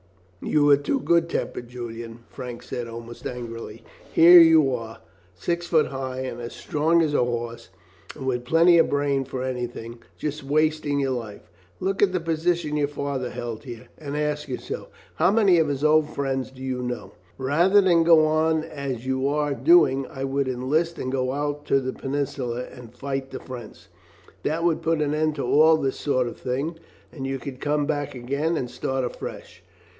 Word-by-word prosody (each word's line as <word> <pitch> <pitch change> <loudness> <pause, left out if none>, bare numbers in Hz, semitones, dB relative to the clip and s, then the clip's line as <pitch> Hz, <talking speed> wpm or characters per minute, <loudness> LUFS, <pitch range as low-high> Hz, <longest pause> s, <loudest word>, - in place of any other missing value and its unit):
"You 145 -1 +3
are 140 - +7
too 145 - -1
good 170 -7 +2
tempered, 120 - -3
Julian," 115 -1 -8
Frank 125 -2 -8
said, 120 -1 -5
almost 115 0 -8
angrily. 115 -2 -7 0.3
"Here 175 +2 +9
are - - +10
you, 155 -6 +5 0.6
six 170 - -2
feet 160 -3 +3
high 130 -1 -4
and 125 -2 -5
as 120 - -6
strong 160 +3 +1
as 150 -2 -1
a 135 - +3
horse, 120 -3 -4 0.5
and 135 - -7
with 125 -2 -1
plenty 165 +5 +5
of - - +4
brain 140 -1 +1
for 130 0 -5
anything, 120 -2 -5 0.2
just 150 -1 -4
wasting 150 0 +1
your 135 -1 0
life. 115 -5 -6 0.3
Look 195 +1 -1
at 200 -2 +5
the 185 - 0
position 165 -2 0
father 140 -3 -3
held 115 -2 -6
here, 120 -3 -9
and 145 -1 -5
ask 150 0 -1
yourself 130 - -5 0.3
how 175 +3 +4
many 200 -4 +4
of 160 - +3
his 140 0 -2
old 155 0 +4
friends 135 -2 -2
do 130 0 -12
you 130 -1 -2
know. 125 -1 -5 0.2
Why, 130 - -5
rather 175 +7 +5
than 175 -4 +4
go 165 -2 +6
on 155 0 +2
as 140 -6 -5
you 130 +1 0
are 145 0 0
doing, 135 0 +4
I 135 -4 -7
would 135 0 0
enlist 150 +7 0
and 130 - -3
go 130 -1 -1
out 145 +1 -3
to 135 - +3
the 130 -1 -3
Peninsula 135 -3 -3
and 125 -1 -12
fight 135 0 -4
the - - -6
French. 125 -4 -10 0.6
That 160 +3 -1
would 170 -2 +1
put 165 -1 +1
an 145 0 -1
end 155 0 +1
to 140 - -3
all 155 +2 +5
this 135 -3 -2
sort 130 -4 +1
of 120 - -8
thing, 140 +6 -3 0.3
and 135 -4 -5
you 135 0 -2
could 130 -1 -8
come 145 0 +1
back 145 -2 -2
again 140 +7 -1
and 125 -4 -3
start 130 -1 -2
afresh. 120 - -8
140 Hz, 190 wpm, -24 LUFS, 125-155 Hz, 0.6 s, are